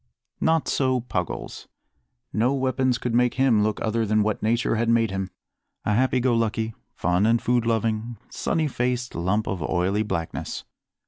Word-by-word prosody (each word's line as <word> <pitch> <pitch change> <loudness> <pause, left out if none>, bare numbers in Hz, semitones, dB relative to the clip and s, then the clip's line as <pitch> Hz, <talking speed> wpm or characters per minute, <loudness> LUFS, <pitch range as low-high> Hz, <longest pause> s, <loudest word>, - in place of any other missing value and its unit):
Not 160 -1 +2
so 130 -2 +1
Puggles. 125 - -4 0.7
No 125 +5 +2
weapons 130 -1 +1
could 125 -1 -3
make 125 0 +3
him 130 -5 +4
look 105 0 0
other 115 +1 +1
than 110 0 +2
what 105 -1 -1
nature 115 +2 +1
had 115 +1 +1
made 115 -2 +3
him 95 -1 -3 0.6
a 105 - +2
happy 130 +3 +2
go 125 0 +2
lucky, 115 -1 0 0.2
fun 90 +4 +2
and 115 +1 +4
food 120 -1 +1
loving, 115 0 0
sunny 160 -2 -1
faced 125 -2 -1
lump 95 +6 0
of 95 -4 -3
oily 90 +6 +1
blackness. 85 -6 -3
115 Hz, 165 wpm, -25 LUFS, 105-125 Hz, 0.7 s, him